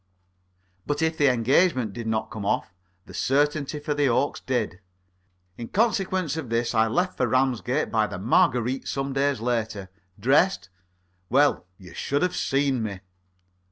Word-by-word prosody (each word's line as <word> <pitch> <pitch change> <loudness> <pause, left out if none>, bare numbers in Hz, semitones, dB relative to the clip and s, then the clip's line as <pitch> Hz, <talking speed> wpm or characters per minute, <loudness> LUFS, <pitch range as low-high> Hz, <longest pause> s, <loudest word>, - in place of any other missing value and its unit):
But 145 +2 -1
if 160 0 +1
the 145 -2 +3
engagement 125 - +2
did 115 +1 -6
not 110 0 -2
come 110 - -6
off, 100 - -1 0.3
the - - -13
certainty 145 +2 0
for 145 0 -2
the 145 -2 +2
Oaks 125 +4 0
did. 115 -8 -2 0.8
In 115 - -5
consequence 190 - 0
of 155 -7 -5
this 115 +1 0
I 110 -1 +3
left 180 +10 0
for 125 - +1
Ramsgate 130 0 0
by 110 -2 +2
the - - -6
"Marguerite" 120 +5 +1
some 135 0 -2
days 135 -2 0
later. 110 -5 -2 0.3
Dressed? 140 - +2 0.6
Well, 140 -7 +3
you 90 -4 -13
should 145 +4 -1
have 180 - 0
seen 135 -2 0
me. 100 -4 -4
130 Hz, 155 wpm, -25 LUFS, 110-145 Hz, 0.8 s, the